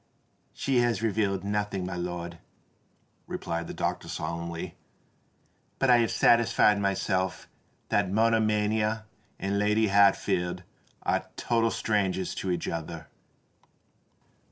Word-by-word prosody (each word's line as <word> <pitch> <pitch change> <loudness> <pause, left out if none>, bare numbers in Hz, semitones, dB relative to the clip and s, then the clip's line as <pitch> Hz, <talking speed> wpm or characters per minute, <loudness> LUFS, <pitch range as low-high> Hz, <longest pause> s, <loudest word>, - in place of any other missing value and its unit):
"She 135 -2 -1
has 120 -2 +1
revealed 100 -3 0
nothing, 100 -2 -2
my 95 - -4
lord," 85 -1 -5 0.9
replied 85 0 -4
the - - -6
doctor - - -2
solemnly. 85 0 -5 1.0
"But 135 -2 +3
I 120 - +7
have 115 -2 +2
satisfied 115 -3 +4
myself 95 -1 -1 0.4
that 100 -2 +1
monomania 110 0 +2 0.3
and 100 +1 -1
Lady 105 +1 +2
Hatfield 95 -3 +3 0.4
are - - 0
total 115 -1 +1
strangers 95 -5 0
to 95 - -4
each 90 -2 -1
other." 80 -2 -5
100 Hz, 105 wpm, -28 LUFS, 90-110 Hz, 1.0 s, I